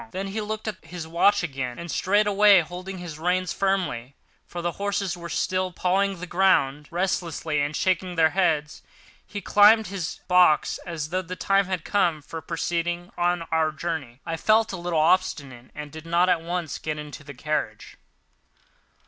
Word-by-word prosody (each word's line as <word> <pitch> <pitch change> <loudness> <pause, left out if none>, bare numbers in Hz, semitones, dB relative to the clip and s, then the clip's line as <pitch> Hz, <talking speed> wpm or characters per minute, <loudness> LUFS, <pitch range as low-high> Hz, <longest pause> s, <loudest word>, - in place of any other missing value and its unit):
Then 195 0 -4
he 215 +3 -3
looked 215 +1 -5
at 210 -3 -5
his 165 0 -7
watch 180 +4 +3
again, 135 -6 -4
and, 170 -1 -6
straightway 205 0 +4
holding 180 +4 -7
his 170 -4 -8
reins 180 +1 0
firmly—for 175 -5 -3
the 175 0 -1
horses 200 -2 -2
were 170 -1 -8
still 185 +4 -1
pawing 190 +2 0
the 180 - -5
ground 150 -6 +2
restlessly 170 -4 -1
and 145 +1 -2
shaking 185 0 0
their 160 -1 +4
heads—he 165 +3 -3
climbed 210 +3 +6
to 190 - -8
his 185 -5 -4
box 180 -4 +4
as 160 -3 -4
though 185 +2 -1
the 185 0 -7
time 195 +3 +2
had 185 -4 -3
come 170 -7 +1
for 160 +2 -7
proceeding 175 +2 -2
on 175 0 0
our 160 -1 +2
journey. 150 -6 -5
I 165 - -3
felt 220 +4 +3
a - - -3
little 175 -1 -2
obstinate 145 -7 0
and 150 -1 -7
did 160 +2 -10
not 175 +2 +3
at 175 -2 +2
once 170 -1 -4
get 155 -1 -3
into 150 0 -8
the 145 -1 -10
carriage. 150 +3 -3
175 Hz, 170 wpm, -25 LUFS, 155-190 Hz, -, climbed